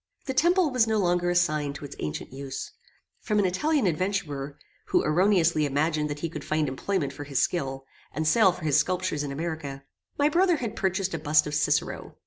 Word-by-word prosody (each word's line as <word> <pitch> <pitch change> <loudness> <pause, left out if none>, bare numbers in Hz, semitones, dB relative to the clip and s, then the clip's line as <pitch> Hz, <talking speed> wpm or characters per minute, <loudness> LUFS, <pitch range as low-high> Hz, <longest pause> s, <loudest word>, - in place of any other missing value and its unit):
The 265 - -2
temple 345 +2 +3
was 250 -3 +3
no 220 -1 +1
longer 175 -2 +1
assigned 155 -5 +1
to 140 - -7
its 145 - -9
ancient 75 +10 -5
use. 135 0 -6 0.5
From 210 - -1
an 205 - +3
Italian 275 - +1
adventurer, 155 -6 -2 0.3
who - - +2
erroneously 170 -1 +3
imagined 150 +2 0
that 145 0 -5
he 165 - -1
could 165 - -7
find 155 -1 0
employment 140 +2 -2
for 145 - -7
his 140 -2 -4
skill, 135 -6 -1 0.3
and 155 0 -2
sale 195 +3 +5
for 175 - -10
his 150 -1 +4
sculptures 185 -4 -1
in 145 -1 -4
America, 145 -2 -5 0.3
my 290 - +3
brother 350 +3 +3
had 240 -8 -4
purchased 190 -1 -1
a 165 - -2
bust 150 0 +3
of 150 - -5
Cicero. 150 - -1
165 Hz, 195 wpm, -26 LUFS, 145-195 Hz, 0.5 s, sale